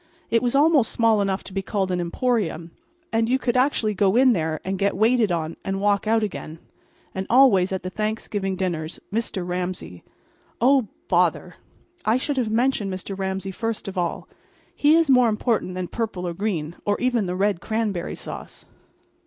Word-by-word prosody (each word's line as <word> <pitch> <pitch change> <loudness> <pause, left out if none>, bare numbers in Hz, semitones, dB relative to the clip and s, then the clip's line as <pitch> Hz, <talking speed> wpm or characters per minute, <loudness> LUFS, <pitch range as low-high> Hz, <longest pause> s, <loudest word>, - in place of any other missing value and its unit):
It 230 - +3
was 245 +1 0
almost 290 -4 +4
small 225 -3 +3
enough 195 -1 -1
to 190 - -11
be 195 - -1
called 195 -1 -2
an 180 - 0
emporium; 170 -4 -1 0.4
and 225 0 +2
you 260 - +3
could 250 -2 -1
actually 250 -5 +2
go 195 0 +2
in 255 0 +6
there 160 -4 -1
and 190 0 -2
get 200 0 +1
waited 225 -1 +3
on 165 -1 -2
and 195 0 -2
walk 205 +1 +1
out 225 0 +3
again. 165 -6 -5 0.6
And 190 0 -4
always 235 -8 +5
at 190 - -3
the 185 - -4
Thanksgiving 210 -2 -2
dinners 170 -4 -3
Mr. 210 -5 -2
Ramsay— 180 - -4 0.6
Oh, 260 -1 +4 0.2
bother! - - +1 0.5
I 220 +3 +3
should 275 +2 -2
have 240 -4 0
mentioned 225 -3 +1
Mr. 190 +1 -5
Ramsay 190 0 -3
first 225 +2 -4
of 195 - -5
all. 175 -2 -2 0.5
He 295 +2 +4
is 330 -1 +4
more 250 -3 +5
important 215 -4 -1
than 185 -1 -3
purple 205 -5 -3
or 170 - -3
green, 170 -4 -3
or 205 0 0
even 240 -5 +1
the 180 - -2
red 195 -2 0
cranberry 215 -5 -2
sauce. - - -9
205 Hz, 180 wpm, -23 LUFS, 185-230 Hz, 0.6 s, in